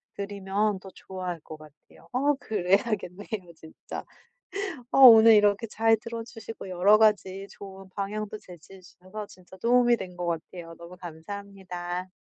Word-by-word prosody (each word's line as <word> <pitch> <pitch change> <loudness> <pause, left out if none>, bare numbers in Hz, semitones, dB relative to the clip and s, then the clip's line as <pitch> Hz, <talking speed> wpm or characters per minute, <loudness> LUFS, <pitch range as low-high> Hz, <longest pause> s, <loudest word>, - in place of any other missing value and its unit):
드리면 200 0 -1
더 190 - -11
좋아할 185 -2 -6
것 155 - -10
같아요. 155 -1 -18
아. 280 +4 +3
그래야겠네요 200 -2 -1
진짜. 160 0 -9 0.9
어 - - +2
오늘 225 -3 +10
이렇게 210 +1 +3
잘 225 +1 +3
들어 230 +1 -6
주시고 225 -3 -9
여러 185 +4 +5
가지 200 -3 +2
좋은 195 -1 -11
방향도 210 +1 -4
제시해 180 +1 -14
주셔서 185 +3 -9
진짜 185 0 -16
도움이 240 +3 +4
된 180 -3 -8
것 175 - -3
같아요. 165 0 -5
너무 170 +1 -11
감사합니다. 180 +1 -7
195 Hz, 315 characters per minute, -27 LUFS, 180-215 Hz, 0.9 s, 오늘